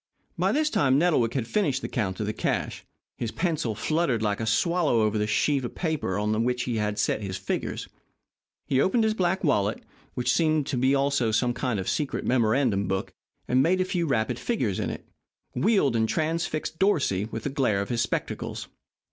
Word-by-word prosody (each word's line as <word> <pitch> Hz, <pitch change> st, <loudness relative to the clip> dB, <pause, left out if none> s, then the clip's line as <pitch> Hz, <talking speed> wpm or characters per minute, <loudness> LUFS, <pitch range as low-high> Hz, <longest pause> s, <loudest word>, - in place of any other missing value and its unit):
By -, -, +1 dB
this 305 Hz, +1 st, +1 dB
time 135 Hz, -2 st, +3 dB
Nettlewick 145 Hz, -8 st, +2 dB
had 130 Hz, -4 st, 0 dB
finished 140 Hz, -, 0 dB
his -, -, -4 dB
count 95 Hz, -7 st, -2 dB
of 105 Hz, -, -1 dB
the 105 Hz, -, -2 dB
cash. -, -, -2 dB, 0.4 s
His 115 Hz, -, -2 dB
pencil 155 Hz, -, -1 dB
fluttered 155 Hz, -5 st, 0 dB
like 105 Hz, -2 st, 0 dB
a 110 Hz, -, -2 dB
swallow 155 Hz, 0 st, +2 dB
over 110 Hz, 0 st, +1 dB
the 105 Hz, -, 0 dB
sheet 135 Hz, +5 st, +1 dB
of 120 Hz, -, -5 dB
paper 155 Hz, -, -1 dB
on 105 Hz, +2 st, 0 dB
which 125 Hz, 0 st, 0 dB
he 120 Hz, -2 st, -2 dB
had 105 Hz, -1 st, -1 dB
set 110 Hz, -, 0 dB
his 95 Hz, -2 st, -4 dB
figures. -, -, -3 dB, 0.8 s
He 135 Hz, -1 st, +2 dB
opened 225 Hz, -, +2 dB
his 220 Hz, 0 st, +2 dB
black 190 Hz, -2 st, 0 dB
wallet, 105 Hz, -, +1 dB, 0.3 s
which 125 Hz, -, +1 dB
seemed 155 Hz, -3 st, +2 dB
to 140 Hz, -, -2 dB
be 130 Hz, +3 st, +3 dB
also 140 Hz, -4 st, +1 dB
a 120 Hz, +3 st, +1 dB
kind 125 Hz, -5 st, -2 dB
of 95 Hz, -, -4 dB
secret 150 Hz, -3 st, -1 dB
memorandum 115 Hz, -4 st, +2 dB
book, 95 Hz, 0 st, -2 dB, 0.3 s
made 150 Hz, +9 st, +3 dB
a 185 Hz, -, +2 dB
few 175 Hz, -2 st, -1 dB
rapid 120 Hz, -2 st, 0 dB
figures 120 Hz, -, -1 dB
in -, -, -1 dB
it, -, -, -7 dB, 0.5 s
wheeled 195 Hz, -, +2 dB
and 110 Hz, -1 st, +1 dB
transfixed 160 Hz, 0 st, -2 dB
Dorsey 145 Hz, -, +2 dB
with 110 Hz, 0 st, -6 dB
the -, -, -1 dB
glare 125 Hz, -8 st, +1 dB
of 100 Hz, -, -3 dB
his 120 Hz, -2 st, 0 dB
spectacles. -, -, -3 dB
125 Hz, 195 wpm, -26 LUFS, 110-160 Hz, 0.8 s, time